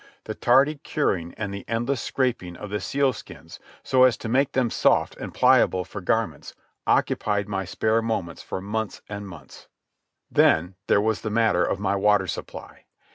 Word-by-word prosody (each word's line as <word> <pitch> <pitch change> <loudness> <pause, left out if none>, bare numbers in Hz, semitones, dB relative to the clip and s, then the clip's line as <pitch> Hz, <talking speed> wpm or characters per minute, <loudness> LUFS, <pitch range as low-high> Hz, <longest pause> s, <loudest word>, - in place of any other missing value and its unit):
The - - -5
tardy 140 +5 +3
curing 95 - -1
and 105 -2 -4
the 100 - -6
endless 120 +2 -1
scraping 120 -10 -2
of 105 - -8
the 105 - -1
sealskins, 135 -2 -3 0.2
so 130 - +2
as 130 -2 +4
to 115 - -6
make 130 +3 +1
them 125 -3 +1
soft - - +2
and - - -7
pliable 90 -1 +3
for - - -8
garments, - - -2 0.3
occupied 105 -1 +1
my 95 -2 -3
spare 110 +5 0
moments 105 -7 -3
for 95 - -5
months 110 +2 -4
and 100 -1 -6
months. 95 - -13 0.6
Then 90 +4 +3
there 100 - +4
was 110 0 0
the 110 - -3
matter 105 -5 +2
of 95 - -1
my 100 0 0
water 100 0 +3
supply. 85 - -8
105 Hz, 170 wpm, -24 LUFS, 95-120 Hz, 0.6 s, as